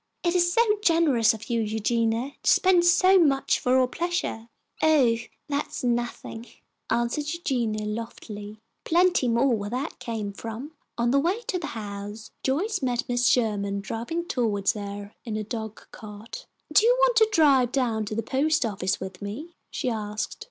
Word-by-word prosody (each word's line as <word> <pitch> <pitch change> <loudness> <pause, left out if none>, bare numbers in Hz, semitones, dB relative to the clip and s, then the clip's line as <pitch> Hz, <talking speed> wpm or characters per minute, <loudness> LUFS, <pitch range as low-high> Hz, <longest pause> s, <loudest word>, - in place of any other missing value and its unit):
It 345 -1 +2
is 350 -1 +3
so 460 +6 +4 0.2
generous 295 - +4
of 220 -1 -7
you, 235 -2 0
Eugenia, 225 +3 0
to - - +3
spend 365 -2 +4
so 370 +2 +6
much 275 -5 +2
for 255 0 +2
our 255 -1 +4
pleasure!" 335 -7 -3 0.3
"Oh, 275 -8 +4 0.3
that's 285 -2 -3
nothing," 240 -1 -2 0.4
answered 240 +6 0
Eugenia, 240 -10 -1
loftily. 210 -1 -6 0.3
"Plenty 350 -4 +3
more 240 +3 +3
where 205 -1 -4
that 255 +7 -4
came 215 -4 -4
from." 230 +8 -7 0.3
On 235 0 +1
the 275 - +4
way 360 +10 0
to 370 -5 -2
the 325 - -5
house, 205 +1 -7
Joyce 375 +9 0
met 250 -2 0
Mrs. 245 0 +2
Sherman 205 -4 +1
driving 235 +12 -4
toward 215 - +1
her 205 -1 -7
in 220 -2 -4
a 215 - -2
dog 220 0 -6
cart. 215 - -10 0.3
"Do 400 - +6
you 485 +2 +5
want - - +4
to 440 -1 +5
drive 275 - +4
down 235 -5 0
to 215 - -5
the 225 - -1
post 280 +4 +1
office 195 -3 -1
with 190 -1 -8
me?" 255 +13 -6 0.2
she - - -4
asked. 215 -2 -3
240 Hz, 165 wpm, -26 LUFS, 215-310 Hz, 0.4 s, so